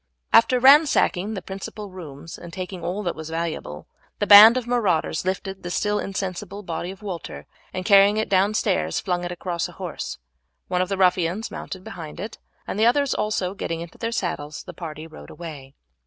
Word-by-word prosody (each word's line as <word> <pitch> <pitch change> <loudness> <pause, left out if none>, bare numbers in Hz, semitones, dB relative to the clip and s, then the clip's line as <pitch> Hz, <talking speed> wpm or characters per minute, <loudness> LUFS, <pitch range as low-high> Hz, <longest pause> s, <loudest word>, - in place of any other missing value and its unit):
After 240 +2 +6
ransacking 260 - +5
the 190 - -6
principal 195 +2 -7
rooms 165 -3 -9
and 170 - -10
taking 185 -1 -6
all 185 +5 -3
that 175 - -1
was 160 0 -7
valuable, 160 - -4 0.3
the - - 0
band 210 +4 +10
of 250 - -2
marauders 205 -9 0
lifted 190 +1 -3
the 175 - -6
still 210 +3 0
insensible 195 +1 -4
body 170 0 -4
of 195 +2 -10
Walter, 185 -5 -6 0.3
and 185 0 -5
carrying 200 0 +6
it 220 - 0
down 200 +2 +2
stairs 80 - 0
flung 180 -1 -2
it 175 - -4
across 175 -1 -3
a - - -13
horse. - - -6 0.5
One 180 0 0
of 185 - -1
the 195 - -1
ruffians 185 +2 +1
mounted 185 -1 -7
behind 160 -5 -8
it, 210 +3 -7 0.3
and 205 - -4
the 220 - +4
others 280 +3 +2
also 195 -3 -1
getting 165 -4 -4
into 170 -1 -10
their 230 - -2
saddles 150 -9 -3
the - - -9
party 160 -2 -7
rode 75 - -12
away. 145 -5 -9
185 Hz, 190 wpm, -23 LUFS, 170-210 Hz, 0.5 s, band